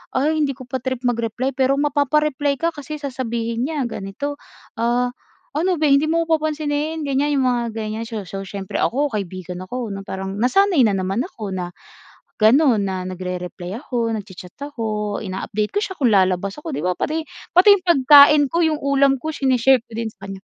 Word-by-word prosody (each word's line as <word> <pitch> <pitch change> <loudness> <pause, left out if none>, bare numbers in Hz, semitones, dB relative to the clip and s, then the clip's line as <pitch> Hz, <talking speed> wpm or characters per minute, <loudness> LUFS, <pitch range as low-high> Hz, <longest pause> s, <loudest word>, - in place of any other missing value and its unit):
ay, 305 +4 +1
hindi 280 -3 0
ko 260 - -10
pa 255 +1 -4
trip 260 0 -4
mag-reply 240 +1 -1
pero 265 +1 +2
mapapa-reply 290 0 +1
ka 335 - +2
kasi 305 -1 -7
sasabihin 240 -4 -3
niya 300 -3 -2
ganito, 235 +6 -5 0.4
“Ah, 240 +2 +1 0.4
ano 350 +2 +1
beh, 310 - +3
hindi 280 - +3
mo 330 0 +1
ako 325 - +4
papansinin?” 305 0 -2
Ganiyan, 280 +1 +1
yung 260 - +2
mga 245 -1 +1
ganiyan. 220 0 -4
So 220 -4 -6
so 195 +2 -6
siyempre 195 0 -7
ako, 285 +5 +1
kaibigan 185 - -5
ako, 245 +5 -5
na 195 -1 -6
parang 190 0 -5
nasanay 310 - +3
na 220 - +4
naman 195 +4 -1
ako 215 - -6
na 175 -1 -4 0.7
gano'n, 235 +1 +4
na 190 -1 -3
nagre-reply 180 +2 -6
ako, 235 -5 -2
nagcha-chat 190 -4 -7
ako, 215 -7 -3
ina-update 200 +2 -3
ko 410 - +1
siya 380 -3 -4
kung 250 -8 +2
lalabas 190 0 +2
ako. 320 +1 -6
‘Di 150 - -4
ba 180 - +2
pati 310 - -2 0.3
pati 390 +3 +8
yung 370 - -10
pagkain 290 -1 +7
ko, 340 - +1
yung 320 -2 +2
ulam 275 -1 +3
ko, 315 +5 -5
sine-share 265 -2 +3
ko - - -19
din 225 -1 -3
sa 195 0 -12
kanya. 195 -1 -7
250 Hz, 185 wpm, -21 LUFS, 205-290 Hz, 0.7 s, pati